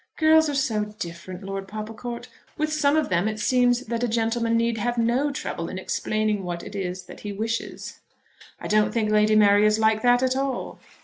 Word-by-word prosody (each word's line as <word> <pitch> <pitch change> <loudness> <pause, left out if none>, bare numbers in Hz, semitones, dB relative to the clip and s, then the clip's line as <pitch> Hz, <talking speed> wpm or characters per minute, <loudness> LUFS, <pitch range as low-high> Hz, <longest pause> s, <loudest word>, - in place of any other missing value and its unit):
"Girls 315 -1 +5
are 290 - -2
so 225 -6 0
different, 175 +2 -7
Lord 195 0 -5
Popplecourt. 225 +3 -6 0.3
With 310 0 -1
some 295 -1 +2
of 310 - 0
them 180 +2 +1
it 215 0 -3
seems 245 +2 +3
that 235 -1 -3
a - - +2
gentleman 230 0 0
need 230 -1 0
have 240 +2 -1
no 240 +5 +1
trouble 170 -10 -4
in 185 - -6
explaining 215 +2 -1
what 175 -1 -4
it 205 - -9
is 185 -1 -4
that - - -12
he 205 - -6
wishes." 225 +3 -4 0.6
"I - - -6
don't 210 0 +3
think 220 -2 0
Lady 215 0 +4
Mary 205 -1 +5
is 215 0 +4
like 220 0 +2
that 245 +1 +4
at 260 0 +1
all." 270 0 -3
220 Hz, 200 wpm, -24 LUFS, 210-245 Hz, 0.6 s, Girls